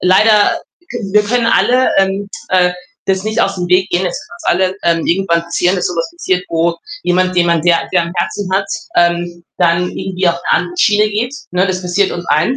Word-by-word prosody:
leider, 205 +3 +4 0.3
können 210 -5 -5
wir 210 - +5
können 230 +2 0
alle, 250 +2 +3
ähm, 195 +1 0 0.2
äh, 180 -1 +3 0.3
das 190 -1 0
nicht 220 +2 -1
aus - - +1
dem 175 -1 -4
Weg 185 +1 +3
gehen, 180 +2 0
es 180 - -4
kann 175 0 -1
uns 190 - +1
allen, 185 0 0 0.3
ähm, - - -4
irgendwann 170 -1 +1
passieren, 180 +2 0
dass 180 - -1
so 180 - -3
etwas 170 - -3
passiert, 190 - -2
wo 170 +1 0 0.3
jemand, 185 +1 +1
den 175 -1 +3
man 170 -2 +1
sehr 170 0 +4
sehr - - +3
am 170 0 -6
Herzen 185 +2 -2
hat, 195 +1 +1 0.3
ähm, 175 0 0
dann 175 0 +2
irgendwie 185 -1 -1
auf 170 - +2
'ne 170 - -5
andere 175 0 0
Schiene 210 +2 +3
geht, 225 +5 -2 0.2
ne? 180 +2 +2
Das 185 0 -2
passiert 185 +2 +1
uns 175 - -5
allen 155 - +2
185 Hz, 220 wpm, -15 LUFS, 175-200 Hz, 0.3 s, wir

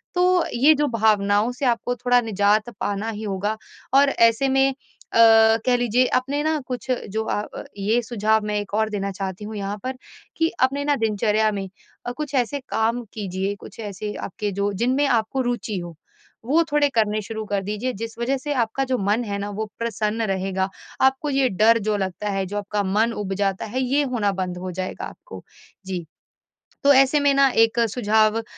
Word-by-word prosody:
तो, 360 0 +3
ये 275 +6 +5
जो 295 0 +1
भावनाओं 215 -1 +2
से 250 +3 -4
आपको 245 0 0
थोड़ा 245 +1 +3
निजात 215 0 +1
पाना 205 +2 -2
ही 215 -1 -5
होगा 205 +1 -2 0.4
और 280 +1 +6
ऐसे 230 +1 +3
में 270 0 +3
अ, 225 -4 +4
कह 250 - +3
लीजिए 245 +1 +2
आपने 275 +3 -1
ना 315 0 +1
कुछ 250 0 -5 0.2
जो 220 0 0
अ - - -2 0.2
अ, - - -6
ये 215 +4 +1
सुझाव 220 -2 +1
मैं 210 0 -2
1 205 0 -7
और 220 0 +1
देना 200 -2 -3
चाहती 190 +1 -5
हूँ 215 +1 -7
यहाँ 200 0 -4
पर, 260 +1 -3 0.4
कि 325 0 +2
अपने 275 +2 +1
ना 290 0 +2
दिनचर्या 215 0 +2
में 195 -2 -4 0.4
अ, 245 - -2
कुछ 295 +2 -6
ऐसे 260 +2 0
काम 230 +2 0
कीजिए, 195 -1 -3
कुछ 200 - -13
ऐसे 210 -1 -5
आपके 205 +2 -4
जो 200 +1 -1
जिनमें 260 +4 +2
आपको 235 +1 +1
रुचि 230 -4 -3
हो 175 -1 -8 0.5
वो 310 +7 +3
थोड़े 295 -1 +3
करने 215 -1 +2
शुरू 220 +1 -6
कर 200 - +1
दीजिए 210 +6 -3
जिस 230 0 -6
वजह 265 +3 0
से 290 +3 -3
आपका 245 +5 -3
जो - - +2
मन 205 +3 0
है 200 -3 -3
ना 205 +1 -4
वो 215 +2 -3
प्रसन्न 225 -1 -1
रहेगा। 190 0 -1 0.3
आपको 265 +3 +2
ये 270 -2 +2
डर 220 +4 +4
जो 210 0 -1
लगता 190 +1 -3
है, 195 -1 -1
जो 205 +3 -5
आपका 205 0 -2
मन 215 +4 +1
उब 195 -2 -3
जाता 195 -1 -1
है, 250 +5 -3
ये 270 +3 +1
होना 240 -7 0
बंद 185 -2 -3
हो 185 +1 -5
जाएगा 185 +1 -5
आपको, - - -11 0.4
जी। 185 -3 -4 0.8
तो 285 - +7
ऐसे 270 +2 +5
में 285 0 +4 0.2
1 225 0 +3
सुझाव 220 0 +2
220 Hz, 195 wpm, -23 LUFS, 205-255 Hz, 0.8 s, तो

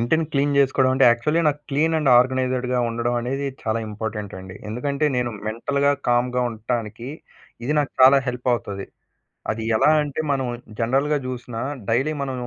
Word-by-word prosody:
ఇంటిని 160 +8 +1
clean 140 0 +1
జేస్కోవడమంటే 135 -1 +3
actually 135 +8 +1
నాకు 145 0 -2
clean 160 +4 +1
and 150 -4 +2
ఆర్గనైజ్డ్‌‌గా 125 0 +1
ఉండడమనేది 120 +4 -2 0.2
చాలా 110 0 -1
ఇంపార్టెంట్ 105 -1 -5
అండి. 95 0 -10
ఎందుకంటే 140 +6 -1
నేను 125 -1 0 0.2
మెంటల్‌గా, 140 +6 0 0.2
కామ్‌గా 125 +1 +2
ఉంటానికి 115 +1 -4 0.6
ఇది 150 +5 0
నాకు 145 - -3
చాలా 130 +2 +8
హెల్ప్ 125 0 -3
అవుతది. 100 -4 -5 0.7
అది 110 0 -4
ఎలా 150 - +4
అంటే 145 +1 -3
మనం 135 -2 0 0.3
జనరల్‌గా 135 +6 +1
జూసినా, 120 -2 -5 0.3
డైలీ 135 +7 +1
మనం 135 -2 -4
125 Hz, 145 wpm, -22 LUFS, 115-140 Hz, 0.7 s, చాలా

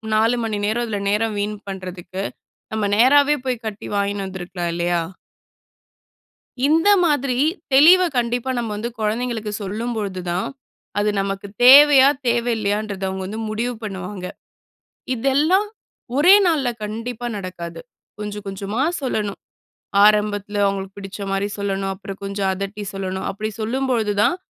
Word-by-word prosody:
4 225 +3 +3
மணி 210 -2 -2
நேரம், 230 +3 0
அதுல 210 -3 -3
நேரம் 215 +1 0
வீண் 210 +1 -2
பண்றதுக்கு, 185 0 -6 0.5
நம்ம 215 -1 -1
நேராவே 285 +5 +5
போய் 250 -2 -2
கட்டி 215 -1 -6
வாங்கின்னு 200 0 -1
வந்துருக்கலாம் 180 -2 -5
இல்லையா? 175 0 0 1.7
இந்த 325 +6 +4 0.2
மாதிரி 275 -5 +1 0.4
தெளிவ 325 +7 +8 0.2
கண்டிப்பா 245 +2 0
நம்ம 235 -2 -2
வந்து 225 +3 -3
குழந்தைங்களுக்கு 220 0 -2
சொல்லும்பொழுது 205 -2 -3
தான், 180 +2 -1 0.5
அது 210 +1 +2
நமக்கு 195 0 -3 0.2
தேவையா? 275 +1 +9 0.2
தேவ 235 0 +2
இல்லையான்றத 205 -1 -2
அவுங்க 190 0 -4
வந்து 215 +3 -5
முடிவு 235 +3 -2
பண்ணுவாங்க. 190 -2 -6 0.9
இதெல்லாம் 295 - +2 0.5
ஒரே 325 +7 +7
நாள்ல 295 -7 +2
கண்டிப்பா 230 +3 -5
நடக்காது. 175 -3 -7 0.4
கொஞ்சம் 210 0 -6
கொஞ்சமா 195 +4 -4 0.2
சொல்லணும். 210 -7 -2 0.7
ஆரம்பத்துல 205 -1 +2
அவுங்களுக்கு 195 0 -2
பிடிச்ச 195 +1 -8
மாரி 195 +1 0
சொல்லணும். 195 -1 -2
அப்புறம் 195 0 -9
கொஞ்சம் 195 -1 -1
அதட்டி 195 +2 -5
சொல்லணும். 190 -1 -4
அப்படி 215 +2 -4
சொல்லும்பொழுது 235 -2 0
தான், 345 - +3
210 Hz, 125 wpm, -21 LUFS, 195-240 Hz, 1.7 s, தேவையா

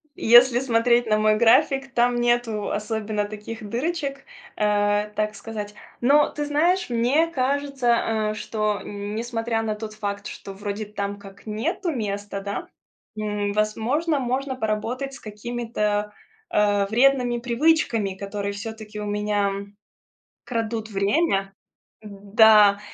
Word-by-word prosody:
Если 240 +1 +6
смотреть 240 -1 +2
на 215 -1 +3
мой 215 0 +3
график, 270 +4 +3
там 245 0 +2
нету 240 -3 0
особенно 215 -1 -2
таких 215 +1 -8
дырочек, 275 +3 -3 0.3
э, 205 0 +1
так 215 0 -1
сказать. 210 -2 -6 0.3
Но, 285 +4 +5
ты 295 - -4
знаешь, 335 +5 +1
мне 245 +7 +2
кажется, 255 -7 0
э, - - -4
что 215 -1 -2
н 205 +1 -6
несмотря 230 -1 -2
на 215 -1 -2
тот 215 0 -7
факт, 200 -1 -4
что 195 - -8
вроде 205 +2 -5
там 200 -1 -4
как 200 +1 -14
нету 285 - -2
места, 205 -5 -4
да, 200 0 -5 0.5
м, 210 -1 -2
возможно, 240 +9 0
можно 260 +1 -2
поработать 245 +4 -2
с 260 - -10
какими-то, 210 -1 -3 0.4
э, 205 -1 +3
вредными 245 +1 +3
привычками, 235 -4 +1
которые 200 +1 -4
всё-таки 215 +1 -7
у 210 - -4
меня 205 -1 0 0.9
крадут 225 -2 -3
время. 195 0 +1 0.5
Да. 205 0 +5
220 Hz, 125 wpm, -24 LUFS, 210-245 Hz, 0.9 s, Если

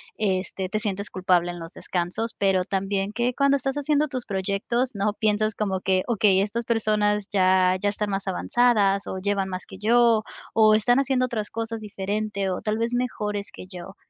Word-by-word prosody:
este, 190 -2 -2
te 215 - -1
sientes 200 -1 -3
culpable 180 -2 +1
en 175 - -8
los 165 +2 -9
descansos, 185 +6 -3
pero 190 -2 +2
también 195 +1 -2
que 240 +3 0
cuando 280 +1 +3
estás 270 0 -2
haciendo 290 +1 +1
tus 255 -4 -5
proyectos, 200 +6 -1
¿no?, 205 0 0
piensas 215 0 0
como 190 -3 -1
que: 185 -1 +1
"Okey, 205 -5 +3
estas 210 +4 -2
personas 210 -3 +1
ya, 185 -1 +4
ya 205 - +2
están 205 0 -3
más 195 0 -3
avanzadas 200 -1 +2
o - - -4
llevan 195 0 -1
más 185 0 -5
que 190 - -12
yo, 230 0 +4 0.3
o 215 -1 +6
están 245 +4 +3
haciendo 265 -2 +1
otras 225 -4 -3
cosas 225 0 -4
diferente, 205 -1 -3
o 180 - -3
tal 215 0 -1
vez 230 +1 -1
mejores 210 -5 -2
que - - -10
yo". 185 +1 -9
210 Hz, 185 wpm, -24 LUFS, 190-230 Hz, 0.3 s, o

